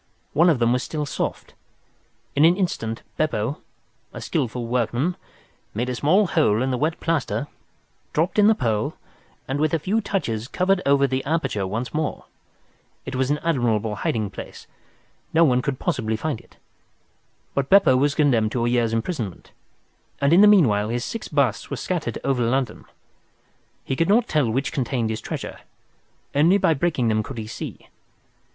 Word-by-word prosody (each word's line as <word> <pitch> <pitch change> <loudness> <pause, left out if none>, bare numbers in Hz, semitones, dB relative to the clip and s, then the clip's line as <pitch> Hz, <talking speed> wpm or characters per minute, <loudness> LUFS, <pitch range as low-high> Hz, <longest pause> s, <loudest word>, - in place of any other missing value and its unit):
One 170 +4 +5
of 160 - +3
them 120 0 +2
was 125 - 0
still 150 -2 -3
soft. - - -4 0.8
In 145 - +4
an 170 +3 +5
instant 115 - -2
Beppo, 140 -3 -1 0.5
a - - -8
skilful 120 -1 -2
workman, 125 +7 0 0.6
made 120 +4 -1
a 125 - -2
small 180 - +3
hole 130 - +2
in 130 - 0
the 125 - 0
wet 160 +3 0
plaster, 155 -4 -1 0.7
dropped 170 +7 0
in 205 - +6
the 220 - +5
pearl, 110 - -1 0.5
and 135 +2 -2
with 155 +1 +2
a - - +3
few 200 +8 0
touches 120 - -2
covered 185 +5 +1
over 140 0 +4
the 130 0 -1
aperture 140 - -1
once 115 +5 -4
more. 155 0 -2 0.8
It 130 - -6
was 130 0 0
an 145 - +2
admirable 115 -9 0
hiding 105 -2 -1
place. - - -9 0.7
No 165 - +6
one 125 -5 +3
could 140 0 -2
possibly 110 -4 -1
find 145 +1 -3
it. - - -25 1.0
But 140 -1 -1
Beppo 195 -9 +6
was 140 +2 +2
condemned 120 -8 +2
to 120 -2 0
a - - +1
year's 120 -2 +1
imprisonment, 115 - -3 0.7
and 140 +3 +3
in 180 - +7
the 210 - +8
meanwhile 115 - +4
his 120 +1 -2
six 230 - -5
busts 140 -7 0
were - - -3
scattered - - -3
over 130 -3 +1
London. 125 -1 -1 1.0
He 135 - -1
could 165 +5 +1
not 230 +3 +4
tell 150 -7 +1
which 135 +5 -1
contained 120 -4 -1
his 110 0 -4
treasure. - - -6 0.7
Only 165 +7 +4
by 165 - +3
breaking 140 -6 0
them 110 0 +2
could 130 +3 -8
he 110 - -4
see. 110 - -8
135 Hz, 170 wpm, -23 LUFS, 115-160 Hz, 1.0 s, the